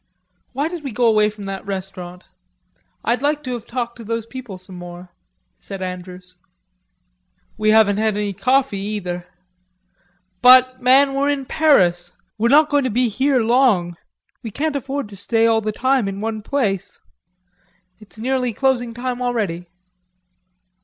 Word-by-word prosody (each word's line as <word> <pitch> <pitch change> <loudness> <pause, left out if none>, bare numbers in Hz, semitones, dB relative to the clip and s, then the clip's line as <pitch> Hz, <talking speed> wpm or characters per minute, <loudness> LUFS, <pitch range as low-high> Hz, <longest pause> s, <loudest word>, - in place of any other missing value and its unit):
"Why 280 +4 -1
did 340 -2 -7
we 275 - -4
go 240 +2 0
away 215 -2 +4
from 210 -1 -10
that 195 -1 -5
restaurant? 185 -2 -7 0.8
I'd 240 +1 +1
like 295 +1 0
to 255 -2 -4
have 235 -2 -7
talked 235 -1 -4
to 235 - -10
those 230 0 -3
people 245 -5 -8
some 185 +1 -10
more," 175 0 -10 0.5
said 195 -1 -8
Andrews. 180 0 -8 1.2
"We 215 0 0
haven't 215 -2 +5
had 215 -1 0
any 205 -1 -2
coffee 250 +2 +1
either.... 185 -4 -4 1.1
But, 255 0 +6
man, 270 +2 +5
we're 280 +1 +1
in 280 -2 -1
Paris. 180 - +2 0.3
We're 230 +2 +2
not 300 +3 +5
going 290 -2 +2
to - - +1
be 245 +2 +1
here 260 +3 +1
long. 220 -7 +2 0.5
We 230 - -6
can't 295 +7 -2
afford 275 -1 -3
to 200 - -11
stay 225 +3 +1
all 225 -1 +3
the 215 0 -2
time 255 0 +1
in 195 0 -4
one 220 0 -3
place.... 210 -6 -2 1.0
It's 215 0 -15
nearly 250 +1 -1
closing 245 -1 0
time 250 0 -4
already...." 205 -9 -2
230 Hz, 155 wpm, -20 LUFS, 195-260 Hz, 1.2 s, But